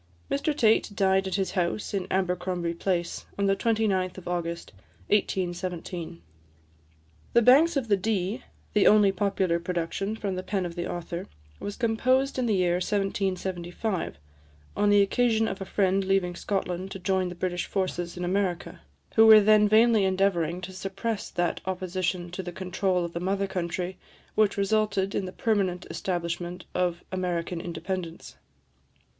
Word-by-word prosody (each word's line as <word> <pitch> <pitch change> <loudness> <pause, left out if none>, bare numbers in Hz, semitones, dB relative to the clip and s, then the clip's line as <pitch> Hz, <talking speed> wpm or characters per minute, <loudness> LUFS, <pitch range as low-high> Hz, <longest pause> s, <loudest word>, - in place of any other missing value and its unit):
Mr 295 +1 0
Tait 220 -5 +4
died 190 0 +2
at 190 - -2
his 195 -1 -1
house 180 +3 -1
in 195 -2 -1
Abercromby 180 -2 -1
Place, 175 0 -2
on 200 - +1
the 195 0 +3
29th 200 -4 0
of 185 - -9
August 170 -1 -3 0.4
1817. 175 - -2 1.1
"The 235 - +6
Banks 290 +7 +6
of 260 -4 -1
the 205 - +4
Dee," 205 +3 -1 0.3
the 210 - +4
only 210 -2 +6
popular 195 -3 0
production 180 +4 -2
from 205 -3 -3
the 185 - -3
pen 190 -1 -2
of 170 - -5
the 175 0 -4
author, 175 0 -5 0.3
was 205 - -5
composed 255 +3 +1
in 250 - +1
the 215 - +2
year 180 -2 +2
1775, 190 -1 -2 0.6
on 205 0 +2
the 205 -1 +6
occasion 225 +1 +2
of 195 -1 -4
a - - -3
friend 195 0 +1
leaving 190 -2 +1
Scotland 185 -1 -2
to 195 - -6
join 190 -1 0
the 175 - -7
British 175 0 -2
forces 175 -2 -2
in 180 - -2
America, 185 -1 -1 0.4
who 225 0 +8
were 220 -1 +10
then 210 0 +5
vainly 220 0 +5
endeavouring 185 -3 +1
to 185 +1 -7
suppress 195 +3 -4
that 175 0 -1
opposition 185 -1 -2
to 180 - -4
the 175 -1 -6
control 185 0 -1
of 170 - -7
the 170 - -3
mother 195 +2 0
country 180 0 -3 0.3
which 215 -2 +2
resulted 200 -1 +1
in 195 - -1
the 185 - -6
permanent 195 -5 0
establishment 175 0 -3
of 180 -1 -1
American 175 -2 -2
independence. 170 0 -5
190 Hz, 155 wpm, -27 LUFS, 175-205 Hz, 1.1 s, were